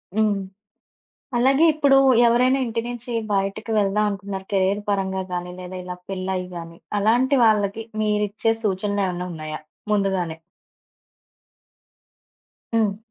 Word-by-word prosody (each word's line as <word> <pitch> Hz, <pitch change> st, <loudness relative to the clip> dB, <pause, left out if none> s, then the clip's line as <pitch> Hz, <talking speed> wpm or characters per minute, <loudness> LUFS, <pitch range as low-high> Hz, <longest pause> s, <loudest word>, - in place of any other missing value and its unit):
హ్మ్. 215 Hz, -1 st, +3 dB, 1.0 s
అలాగే 270 Hz, +5 st, +4 dB
ఇప్పుడు 285 Hz, -3 st, +4 dB, 0.3 s
ఎవరైనా 250 Hz, +3 st, +4 dB
ఇంటి 230 Hz, 0 st, -1 dB
నుంచి 240 Hz, 0 st, -6 dB, 0.2 s
బయటకి 195 Hz, +3 st, -1 dB
వెళ్దాం 205 Hz, +1 st, +2 dB
అనుకున్నారు, 195 Hz, -1 st, -5 dB
కెరియర్ 195 Hz, +1 st, +2 dB
పరంగా 190 Hz, -1 st, 0 dB
గాని, 180 Hz, 0 st, -3 dB
లేదా 180 Hz, 0 st, -7 dB
ఇలా 180 Hz, 0 st, -6 dB
పెళ్ళై 190 Hz, -1 st, -2 dB, 0.2 s
గాని, 165 Hz, 0 st, -8 dB, 0.2 s
అలాంటి 245 Hz, +6 st, +3 dB
వాళ్ళకి 215 Hz, 0 st, +2 dB, 0.2 s
మీరిచ్చే 210 Hz, +1 st, +1 dB
సూచనలేమన్నా 190 Hz, -2 st, -1 dB
ఉన్నాయా 155 Hz, -1 st, -5 dB, 0.3 s
ముందుగానే? 190 Hz, -5 st, 0 dB, 2.4 s
హ్మ్. 210 Hz, -3 st, +2 dB
200 Hz, 105 wpm, -23 LUFS, 190-225 Hz, 2.4 s, అలాగే